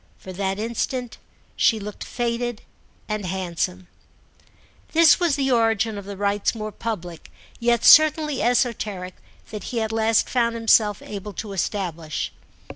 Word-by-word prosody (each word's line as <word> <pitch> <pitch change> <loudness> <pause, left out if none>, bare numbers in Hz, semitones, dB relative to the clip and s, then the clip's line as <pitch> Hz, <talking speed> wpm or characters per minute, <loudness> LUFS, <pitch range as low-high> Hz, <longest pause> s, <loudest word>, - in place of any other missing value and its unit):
For 185 - -10
that 195 +1 -2
instant 235 +3 -3 0.4
she 225 -3 +3
looked 210 0 -7
faded 240 -1 -3 0.4
and 215 -1 -3
handsome. 185 0 -3 1.1
This 325 -1 +6
was 340 -5 +2
the 270 -2 0
origin 225 -2 +2
of 200 -1 -7
the 200 -1 -7
rites 205 +2 0
more 215 -1 -5
public, 180 -7 -6 0.3
yet 235 -1 +1
certainly 305 -2 +6
esoteric, 220 -7 -1 0.3
that 210 -1 -6
he 240 - -3
at 220 -1 -2
last 225 0 +2
found 235 -2 +1
himself 220 -2 +3
able 205 0 -7
to 200 +3 -6
establish. 170 -5 -3
220 Hz, 135 wpm, -23 LUFS, 195-235 Hz, 1.1 s, This